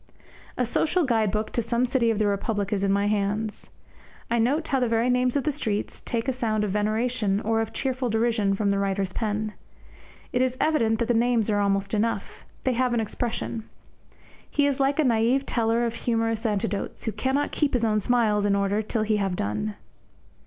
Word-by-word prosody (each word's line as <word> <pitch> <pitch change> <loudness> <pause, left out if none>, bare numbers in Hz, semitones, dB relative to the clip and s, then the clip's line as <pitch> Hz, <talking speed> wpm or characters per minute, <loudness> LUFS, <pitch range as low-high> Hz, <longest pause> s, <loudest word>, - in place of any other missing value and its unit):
A 250 - +1
social 325 +9 +1
guide 225 -5 +2
book 215 +2 -2
to 235 - 0
some 235 +2 0
city 245 -2 +1
of 225 - +1
the 215 - +2
Republic 205 0 -1
is 200 -1 0
in 195 - +2
my 200 +1 +2
hands. 210 +1 -1 0.6
I 235 - +2
note 290 +8 +1
how 270 - +2
the 250 - +1
very 230 +2 +2
names 250 +1 +2
of 280 - -2
streets 215 -7 -3
take 230 +1 -2
a 265 - +1
sound 220 -4 0
of 205 - -1
veneration 215 0 0
or 225 +1 +1
of 225 - -3
cheerful 260 -2 -2
derision 220 -3 +1
from 200 0 +1
the 200 - +1
writer's 195 -1 -1
pen. 215 -1 -2 0.8
It 245 - +2
is 255 0 0
evident 230 -8 +2
that 235 0 -1
the 240 - +2
names 230 -2 +2
are 205 - +2
almost 195 0 0
enough. 220 +2 -2 0.2
They 260 - +1
have 250 0 +1
an - - +2
expression. 225 0 -3 0.8
He 290 - +2
is 280 -1 0
like 275 +1 +2
a 310 - +3
naif 240 +2 +2
teller 230 -1 +1
of 230 - -2
humorous 225 -1 -1
anecdotes, 205 -1 -2
who 220 - -1
cannot 265 +5 -1
keep 295 -2 0
his 240 -2 +2
own 215 -1 +2
smiles 215 -2 +2
in 200 -1 +2
order 200 +1 +1
till 220 +1 -1
he 215 0 +1
have 195 -3 -1
done. 105 - -2
225 Hz, 200 wpm, -25 LUFS, 205-245 Hz, 0.8 s, a